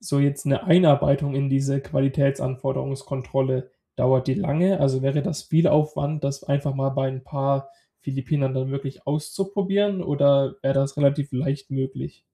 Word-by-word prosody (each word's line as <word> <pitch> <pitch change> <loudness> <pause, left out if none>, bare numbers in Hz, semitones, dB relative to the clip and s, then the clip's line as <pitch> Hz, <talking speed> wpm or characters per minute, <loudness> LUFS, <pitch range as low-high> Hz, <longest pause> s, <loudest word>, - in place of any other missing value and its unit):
so 160 -10 -1
jetzt 140 0 +1
'ne 135 -1 +1
Einarbeitung 145 -4 +4
in 140 0 0
diese 135 0 +1
Qualitätsanforderungskontrolle, 135 -1 -1 0.3
dauert 130 0 +2
die 130 - +1
lange? 180 +8 +1
Also, 135 -1 +2
wäre 140 +2 +1
das 165 -6 -4
viel 165 +4 +3
Aufwand, 150 -1 0
das 140 0 -3
einfach 140 0 -1
mal 135 0 0
bei 135 -1 -1
'n 130 0 -6
paar 135 -1 -1 0.3
Philippinern 135 0 -2
dann 130 0 -2
wirklich 135 0 -6
auszuprobieren 195 +6 -1
oder 140 -4 +2
wär 135 - +2
das 135 +1 0
relativ 145 0 +1
leicht 135 +2 -3
möglich? 130 -1 -5
140 Hz, 150 wpm, -23 LUFS, 135-145 Hz, 0.3 s, Einarbeitung